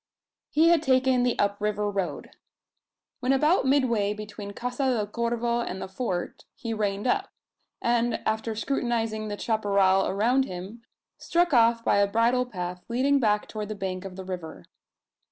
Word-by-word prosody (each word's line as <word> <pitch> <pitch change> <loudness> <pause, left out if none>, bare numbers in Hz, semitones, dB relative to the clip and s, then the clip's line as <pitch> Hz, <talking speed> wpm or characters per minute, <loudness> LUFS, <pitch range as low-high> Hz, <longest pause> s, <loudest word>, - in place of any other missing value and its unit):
He 320 +3 +4
had 340 -3 +4
taken 260 -3 +3
the 245 -1 +1
up 200 0 +1
river 210 0 0
road. 190 -8 -3 0.9
When 255 +1 0
about 300 +2 +3
midway 235 -7 +2
between 210 -1 -8
Casa 250 +5 -3
del 240 -5 +1
Corvo 235 +2 -1
and 190 -5 -4
the - - -5
Fort, 190 -3 -4
he 230 -1 -4
reined 205 -1 -2
up; 250 - +1 0.5
and, 235 -1 +2
after 220 0 -1
scrutinising 225 -3 -1
the 205 -1 -4
chapparal 200 -4 +2
around 240 +7 +2
him, 190 +3 -8 0.4
struck 345 -2 +1
off 230 -1 +4
by - - +3
a 200 0 +4
bridle 235 +4 +2
path 180 -5 -5
leading 270 +4 +2
back 210 -4 +1
toward 215 -1 -5
the 215 - -4
bank 190 -2 -4
of 190 -2 -8
the 190 0 -8
river. 160 - -7
220 Hz, 160 wpm, -26 LUFS, 200-250 Hz, 0.9 s, He